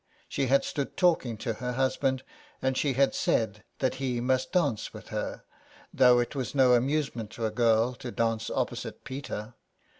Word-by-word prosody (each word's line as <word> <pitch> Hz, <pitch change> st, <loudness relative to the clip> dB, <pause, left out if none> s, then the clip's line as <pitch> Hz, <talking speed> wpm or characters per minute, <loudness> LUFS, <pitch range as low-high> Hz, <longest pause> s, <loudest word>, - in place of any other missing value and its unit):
She 135 Hz, -1 st, -1 dB
had 140 Hz, +2 st, +4 dB
stood 140 Hz, -2 st, -3 dB
talking 160 Hz, -, +2 dB
to 115 Hz, -, -2 dB
her 125 Hz, 0 st, -2 dB
husband, 130 Hz, 0 st, 0 dB, 0.4 s
and 130 Hz, 0 st, 0 dB
she 140 Hz, 0 st, +1 dB
had 135 Hz, +2 st, +3 dB
said 110 Hz, -2 st, 0 dB
that 130 Hz, -, +1 dB
he 125 Hz, -3 st, 0 dB
must 130 Hz, +1 st, 0 dB
dance 145 Hz, -, 0 dB
with -, -, -10 dB
her, -, -, -4 dB, 0.5 s
though 125 Hz, -1 st, +6 dB
it 120 Hz, 0 st, 0 dB
was 135 Hz, -1 st, -4 dB
no 130 Hz, -2 st, +6 dB
amusement 130 Hz, -3 st, 0 dB
to 115 Hz, -, -3 dB
a 110 Hz, -, 0 dB
girl 115 Hz, +1 st, +3 dB
to 125 Hz, 0 st, -7 dB
dance 115 Hz, -1 st, -1 dB
opposite -, -, -3 dB
Peter. 120 Hz, -5 st, -6 dB
125 Hz, 175 wpm, -28 LUFS, 115-135 Hz, 0.5 s, though